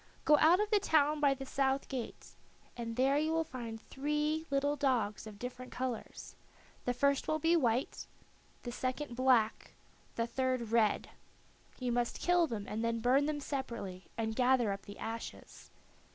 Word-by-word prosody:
Go 300 - +7
out 340 +4 +6
of 420 +1 0
the 420 - +5
town 305 -4 +3
by 280 -2 +4
the 270 0 -7
south 270 0 0
gate, 255 -4 -6 0.4
and 230 -1 -5
there 270 +3 +3
you 310 +1 0
will 325 0 +2
find 235 -6 -7
three 300 +5 -2
little 285 +1 +1
dogs 240 -7 0
of 210 -1 -10
different 250 +2 -7
colors; 255 -2 -5 0.5
the 245 - +1
first 280 +1 +2
will 310 - +1
be 325 +2 +3
white, 250 -5 0 0.6
the 240 - -4
second 255 +1 -3
black, 245 -4 +2 0.4
the 230 - 0
third 255 -1 -1
red. 225 -3 +2 0.7
You 250 -2 -2
must 240 0 -1
kill 355 -1 +3
them 215 -6 -4
and 220 +2 -3
then 230 0 0
burn 260 +5 +3
them 305 -1 -1
separately, 235 -10 -5
and 220 -1 -1
gather 250 -3 +3
up 195 0 -6
the 205 - -9
ashes. 225 +1 -7
255 Hz, 165 wpm, -33 LUFS, 230-290 Hz, 0.7 s, Go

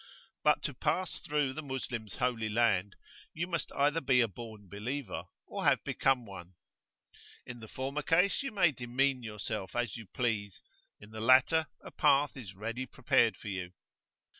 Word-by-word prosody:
But - - +4
to - - -2
pass 185 -1 -1
through 145 -3 0
the 155 - -5
Moslem's 125 -7 -5
Holy 120 -3 0
Land, 105 -4 +2 0.4
you 165 +2 -1
must 175 -2 -2
either 145 +3 +2
be 130 -4 +4
a 115 - +3
born 110 0 -10
believer, 110 +3 -4 0.2
or - - -5
have - - +4
become 130 -3 +1
one; 95 -3 -10 0.9
in 125 -1 -8
the 110 - -10
former 135 +5 -3
case 180 - +3
you 275 - -3
may 190 -6 +4
demean 130 +1 0
yourself 105 -4 -5
as 120 -4 -1
you 115 -3 -10
please, 105 -3 -2 0.4
in 105 +1 -14
the 110 0 -6
latter 135 +7 +5 0.2
a - - -9
path 145 -1 +3
is 105 -8 -9
ready 115 +6 -4
prepared 120 -2 +2
for 105 - -7
you. 90 -2 -4
120 Hz, 165 wpm, -32 LUFS, 105-140 Hz, 0.9 s, latter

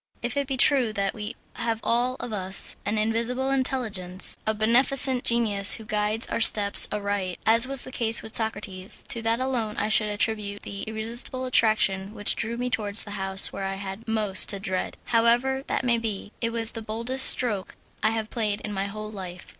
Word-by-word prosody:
If 240 +2 -4
it 280 -1 -2
be 265 -1 -3
true 255 -3 +3
that 200 -1 -2
we 210 -1 -7 0.2
have 230 -1 -3
all 245 +2 0
of 235 - -6
us 190 -1 0
an 210 +1 -1
invisible 235 +5 -1
intelligence 220 -9 -2
a 220 - +1
beneficent 250 +3 +2
genius 210 -4 +6
who 220 - -10
guides 210 +1 0
our - - -4
steps 205 -2 +8
aright 200 -3 -4
as 230 +3 +5
was 270 -1 +1
the 260 - -9
case 230 -2 +3
with 220 - -9
Socrates, 200 -4 0
to 235 - -4
that 225 +1 -1
alone 245 -5 -3
I 210 - -2
should 215 -1 +3
attribute 205 -1 -2
the 200 - -7
irresistible 230 +4 -2
attraction 215 -4 +1
which 205 - +2
drew 230 +1 -5
me 250 +1 -4
towards 210 -2 -1
the 205 - -11
house 195 -1 0
where 195 - -5
I 195 0 -4
had 195 +3 -9
most 210 -4 +2
to 200 - -2
dread. 190 -2 -4
However 240 +3 +1
that - - -3
may 235 -1 +1
be, 210 -3 -5
it 230 - -1
was 230 -1 -2
the 225 - -8
boldest 230 +5 +2
stroke 210 -7 -1 0.3
I 215 - +2
have 220 -1 -4
played 210 -4 -2
in 210 - -6
my 195 0 -3
whole 215 +1 -8
life. 185 -3 -10
220 Hz, 195 wpm, -24 LUFS, 205-235 Hz, 0.3 s, steps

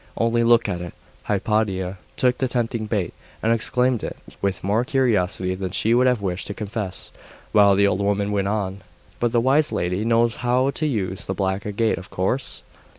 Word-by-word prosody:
Only 115 +1 +2
look 115 -1 +4
at 90 -4 -3
it!' 90 - -7 0.3
Hypatia 100 -3 0 0.2
took 125 -1 +2
the 130 - +1
tempting 115 -2 -2
bait, 100 -5 -1 0.3
and 115 +1 +3
examined 125 +1 +1
it - - -5 0.2
with 100 -2 -1
more 105 +5 +2
curiosity 105 -9 +1
than 95 0 -4
she 110 +5 +1
would 125 +2 +4
have 125 -5 +1
wished 95 -1 -2
to 100 - -5
confess; 105 -3 -5 0.4
while 100 -2 +6
the 100 +1 +4
old 100 -1 +1
woman 100 0 0
went 100 -1 0
on 100 -2 -2 0.4
'But 120 -1 +1
the 120 - +3
wise 135 +5 +3
lady 90 +4 -1
knows 115 0 +2
how 125 +2 +1
to 155 +3 -2
use 95 -8 -2
the 95 - -3
black 95 +1 -1
agate, 110 +1 0
of 95 - -11
course? 110 +9 -2
105 Hz, 190 wpm, -23 LUFS, 95-120 Hz, 0.4 s, while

